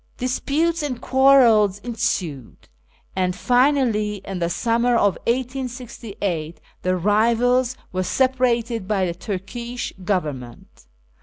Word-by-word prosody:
Disputes 300 +6 0
and 270 -5 -3
quarrels 250 -7 +5
ensued, 200 - -4 0.5
and 180 -1 0
finally, 245 -3 +2
in 195 -2 -5
the 170 -1 0
summer 235 +5 +1
of 205 -3 +4 0.2
1868, 235 - -3 0.2
the 185 0 0
rivals 235 +6 +2
were 185 - -1
separated 240 -2 0
by 195 -3 +1
the 170 - -2
Turkish 230 +7 -5
Government. 145 - -4
230 Hz, 100 wpm, -22 LUFS, 185-250 Hz, 0.5 s, quarrels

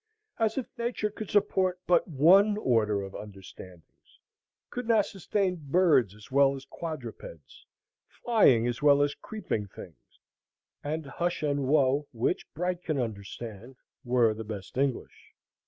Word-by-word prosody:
As 220 +1 +1
if 260 - -1
Nature 235 -3 -1
could 215 -1 -7
support 185 -3 +1
but 180 - +3
one 190 +7 +5
order 110 - +1
of 95 - -8
understandings, 95 -4 -13 0.5
could 245 -1 -5
not 220 -4 +4
sustain 195 0 -1
birds 140 - +3
as 105 +5 -16
well 140 0 +4
as 135 0 -10
quadrupeds, 120 - -9 0.4
flying 140 - +3
as 120 +2 -2
well 145 -1 +5
as 145 0 0
creeping 160 - -4
things, 90 -3 -14 0.7
and 155 +1 -3
hush 175 +4 -3
and 145 -1 0
who, 140 +1 +2
which 120 +9 -2
Bright 180 +2 -2
can 155 -4 -2
understand, 115 +1 -6 0.3
were 120 -3 +3
the 110 +1 -7
best 105 -3 -8
English. 135 -1 -3
140 Hz, 140 wpm, -28 LUFS, 115-180 Hz, 0.7 s, one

